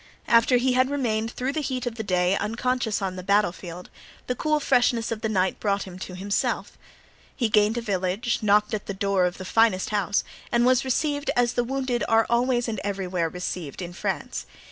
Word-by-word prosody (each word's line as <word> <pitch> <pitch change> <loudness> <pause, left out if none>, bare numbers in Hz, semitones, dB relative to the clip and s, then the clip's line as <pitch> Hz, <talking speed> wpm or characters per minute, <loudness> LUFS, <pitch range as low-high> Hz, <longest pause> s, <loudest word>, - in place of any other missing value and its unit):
After 235 +2 +5
he 255 +1 +2
had 255 +1 +3
remained 225 -6 -1
through 255 +3 -3
the 310 - -1
heat 255 -3 -3
of 245 - -2
the 225 - -5
day 180 -1 +2
unconscious 225 0 -1
on 185 -1 -3
the - - -4
battle 200 0 +3
field, 175 0 -10 0.3
the 250 - -1
cool 305 +4 0
freshness 245 -4 +2
of 220 -1 -3
the 220 - -1
night 190 -3 0
brought 200 -1 0
him 185 -1 -10
to 185 0 -7
himself. 200 +2 -1 0.6
He 235 -5 0
gained 210 +2 +3
a - - -1
village, 200 +2 -1
knocked 210 0 +3
at 210 - -3
the 200 - -4
door 195 -1 +1
of 180 0 -2
the 185 - -7
finest 215 -2 +2
house 205 -2 +1 0.3
and 235 0 +3
was 255 +1 +4
received 285 +3 -1
as 245 0 +2
the 245 - +1
wounded 260 -1 -1
are 225 0 +4
always 240 0 +2
and 220 -3 -3
everywhere 185 -4 -1
received 180 -3 -5
in 175 -1 -6
France. - - -3
220 Hz, 205 wpm, -25 LUFS, 190-245 Hz, 0.6 s, After